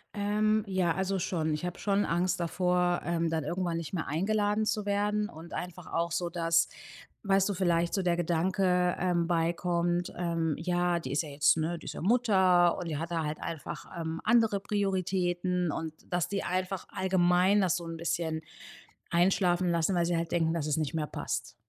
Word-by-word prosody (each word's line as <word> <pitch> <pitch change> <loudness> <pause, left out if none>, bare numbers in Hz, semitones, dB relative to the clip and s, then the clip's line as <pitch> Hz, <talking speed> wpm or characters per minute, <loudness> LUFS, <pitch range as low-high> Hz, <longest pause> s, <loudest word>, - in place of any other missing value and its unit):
Ähm. 215 +1 +1
Ja, 185 -3 +1
also 190 0 -1
schon. 160 -3 -1
Ich 150 +3 -3
habe 180 - -5
schon 205 0 +1
Angst 180 +1 0
davor, 180 0 +1
ähm, 170 -1 0
dann 160 -2 -1
irgendwann 175 +2 -2
nicht 165 +1 -6
mehr 160 - -2
eingeladen 205 +6 +1
zu 210 -1 -1
werden 205 +1 0
und 160 +2 -11
einfach 180 -1 -6
auch 170 +1 0
so, 175 +1 -1
dass- 165 -1 +2 0.5
weißt 195 -1 +3
du- - - 0
vielleicht 175 -2 +1
so 195 - +1
der 175 -1 +2
Gedanke, 180 +1 +1
ähm, 175 -2 +1
beikommt, 175 +1 0
ähm: 165 -3 -1
„Ja, 175 0 0
die 130 - -6
ist 145 +4 +1
ja 155 - -8
jetzt, 145 +2 +3
ne 165 +2 -1
die - - -14
ist - - -5
ja - - -7
Mutter 190 -5 +4
und 175 - -5
die 155 - -2
hat 165 +3 -4
da 165 -2 0
halt 150 0 -3
einfach, 165 -3 -6
ähm, 160 0 -4
andere 225 -3 +3
Prioritäten“ 185 -3 0
und 160 +1 -4 0.2
dass 175 -1 +1
die 200 +2 -2
einfach 185 +1 -2
allgemein 185 +1 +3
das 185 -3 +2
so 170 - -7
'n 165 0 -6
bisschen 165 -1 -2 0.7
einschlafen 180 0 +2
lassen, 170 +2 +1
weil 170 -1 +2
sie 170 0 0
halt 165 0 -3
denken, 165 -2 +1
dass 160 -3 -2
es 150 - 0
nicht 155 0 -2
mehr 155 -2 -1
passt. - - -4
175 Hz, 195 wpm, -29 LUFS, 165-190 Hz, 0.7 s, Mutter